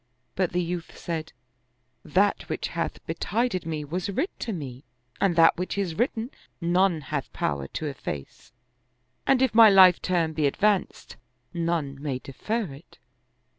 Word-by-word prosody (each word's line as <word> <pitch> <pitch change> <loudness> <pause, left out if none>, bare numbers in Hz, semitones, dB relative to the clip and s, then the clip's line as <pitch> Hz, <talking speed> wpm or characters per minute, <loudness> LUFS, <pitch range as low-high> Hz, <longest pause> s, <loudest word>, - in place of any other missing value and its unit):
But 185 -2 0
the 180 0 0
youth 170 0 -5
said, 160 -2 -4 0.4
"" 120 +1 -46 0.2
That 200 +5 +1
which - - -2
hath - - -4
betided 220 -7 -1
me 155 -2 -3
was 180 +7 -3
writ 325 - -1
to 230 - -3
me 135 - -6 0.4
and 190 -4 +2
that 165 -1 +6
which 180 +2 -3
is 190 -5 -1
written 235 - -1 0.3
none 175 -1 +2
hath 140 -1 -4
power 70 -1 -2
to 155 - -5
efface; 100 - -6 0.8
and 265 -1 +4
if 260 - +2
my 225 -1 +9
life 185 -3 +7
term 170 -3 0
be 155 -2 +2
advanced, 200 +6 0 0.4
none 165 -5 -2
may 140 -4 -2
defer 215 - -3
it." 140 +4 -15
170 Hz, 155 wpm, -26 LUFS, 150-195 Hz, 0.8 s, my